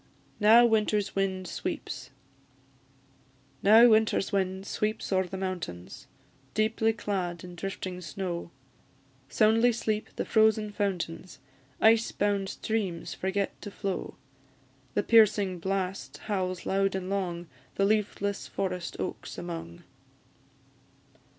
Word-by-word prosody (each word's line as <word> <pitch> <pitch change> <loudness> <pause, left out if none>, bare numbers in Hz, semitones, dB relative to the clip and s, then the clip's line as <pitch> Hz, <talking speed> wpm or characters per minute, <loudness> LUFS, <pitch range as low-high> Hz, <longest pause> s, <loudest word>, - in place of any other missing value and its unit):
NOW 225 +3 +7
WINTER'S 215 -2 +1
WIND 190 -1 -1
SWEEPS. - - -5 1.5
Now 220 +4 +8
winter's 220 -3 +3
wind 190 -1 -1
sweeps 215 -1 -2
o'er 190 -1 +2
the 190 - -6
mountains, 175 - -5 0.5
Deeply 220 +1 +2
clad 185 -6 -3
in 180 -1 -9
drifting 185 0 -5
snow; 175 -1 -4 0.8
Soundly 225 +3 +4
sleep 220 -2 -2
the - - -2
frozen 220 -1 +3
fountains; 185 -3 -3 0.4
Ice 225 +1 +4
bound 200 -1 0
streams 200 -7 -3
forget 190 +1 -2
to 205 - -6
flow: 195 -2 -4 0.8
The - - +2
piercing 205 -5 +4
blast 185 -6 -3
howls 185 -4 -2
loud 195 0 +1
and 185 -1 -3
long, 180 -3 -2 0.3
The 195 - +2
leafless 205 -1 0
forest 180 -2 -3
oaks - - -5
among. 165 - -7
195 Hz, 110 wpm, -28 LUFS, 185-215 Hz, 1.5 s, Now